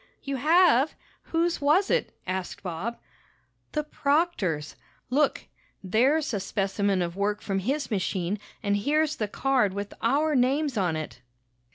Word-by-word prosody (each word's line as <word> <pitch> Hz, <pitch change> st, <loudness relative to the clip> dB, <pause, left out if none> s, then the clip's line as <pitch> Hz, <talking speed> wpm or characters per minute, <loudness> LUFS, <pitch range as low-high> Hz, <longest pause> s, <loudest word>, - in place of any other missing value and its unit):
"You 275 Hz, -1 st, -3 dB
have? 310 Hz, -1 st, +4 dB, 0.3 s
Whose 335 Hz, 0 st, 0 dB
was 315 Hz, +8 st, +3 dB
it?" -, -, 0 dB
asked 190 Hz, +2 st, -4 dB
Bob. 185 Hz, +6 st, -4 dB, 0.8 s
"The 300 Hz, -, 0 dB
proctor's! 280 Hz, -, 0 dB, 0.4 s
Look, 285 Hz, +2 st, +2 dB, 0.4 s
there's 265 Hz, -, +2 dB
a 205 Hz, -, 0 dB
specimen 195 Hz, 0 st, 0 dB
of 170 Hz, 0 st, -4 dB
work 205 Hz, +1 st, 0 dB
from 195 Hz, -1 st, -2 dB
his 270 Hz, +8 st, -2 dB
machine 190 Hz, 0 st, -1 dB, 0.2 s
and 205 Hz, -1 st, +2 dB
here's 305 Hz, +7 st, +1 dB
the 215 Hz, -, -1 dB
card 245 Hz, -3 st, +1 dB
with 200 Hz, 0 st, -4 dB
our 290 Hz, +6 st, +2 dB
names 270 Hz, +2 st, +2 dB
on 180 Hz, -6 st, +1 dB
it." 155 Hz, -5 st, -6 dB
235 Hz, 140 wpm, -27 LUFS, 195-300 Hz, 0.8 s, have